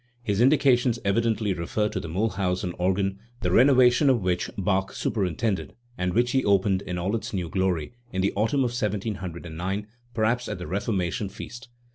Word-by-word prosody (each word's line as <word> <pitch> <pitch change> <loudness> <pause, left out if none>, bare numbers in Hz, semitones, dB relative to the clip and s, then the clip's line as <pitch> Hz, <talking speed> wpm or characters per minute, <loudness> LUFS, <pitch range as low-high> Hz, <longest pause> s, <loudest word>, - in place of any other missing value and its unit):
His 105 -2 0
indications 125 -3 +4
evidently 110 0 +1
refer 90 +5 -1
to - - -3
the - - -6
Miihlhausen 90 -1 -1
organ, 95 +2 0 0.2
the 90 - 0
renovation 130 - +5
of 120 -6 +2
which 90 -1 0
Bach 95 0 0
superintended, 95 0 -1 0.2
and 90 -2 -2
which 120 +1 +3
he 130 0 +2
opened, 100 -1 +2
in 90 -2 -4
all 95 +5 -1
its 115 - -4
new 90 -3 -2
glory, 95 0 -1 0.2
in 95 0 -1
the 100 - +1
autumn 115 +7 +1
of 125 -2 +1
1709, 95 -4 -3 0.3
perhaps 115 +3 +1
at 105 - -3
the 90 - -6
Reformation 100 +1 -1
feast*. 120 +5 -9
100 Hz, 165 wpm, -26 LUFS, 90-115 Hz, 0.3 s, renovation